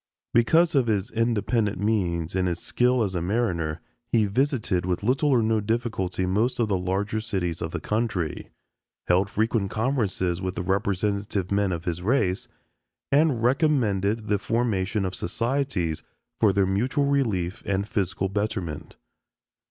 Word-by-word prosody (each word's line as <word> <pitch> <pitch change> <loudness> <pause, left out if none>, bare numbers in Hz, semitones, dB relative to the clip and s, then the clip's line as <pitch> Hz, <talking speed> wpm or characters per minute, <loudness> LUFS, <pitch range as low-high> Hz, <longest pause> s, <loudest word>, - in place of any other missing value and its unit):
Because 165 +9 +4
of 135 -5 +3
his 105 -1 0
independent 115 -2 0
means 90 -6 0
and 95 -1 +1
his 85 -1 -1
skill 125 +6 +1
as 95 -3 -2
a 90 - -1
mariner, 85 -6 -1 0.3
he 110 -3 +4
visited 110 - 0
with 90 +1 -2
little 135 +6 +2
or 125 -5 +4
no 110 0 +2
difficulty 105 -4 -1
most 105 +7 +1
of 115 - +2
the 100 - +2
larger 95 +4 -1
cities 95 -7 -2
of 80 - -2
the - - -4
country, 105 -7 -2 0.6
held 95 +3 +2
frequent 110 -2 0
conferences 105 -7 -1
with 95 -1 -3
the - - -3
representative 100 0 -1
men 100 -1 +2
of 85 -1 -4
his 85 0 -2
race, 105 0 +1 0.6
and 140 -5 +3
recommended 115 - +1
the 105 -1 +1
formation 105 -3 0
of 95 - -3
societies 115 - -1 0.4
for 105 - +5
their 100 0 +2
mutual 125 +9 +1
relief 110 -9 0
and 100 -1 -1
physical 95 -2 -1
betterment. 95 -6 -3
105 Hz, 150 wpm, -25 LUFS, 95-115 Hz, 0.6 s, for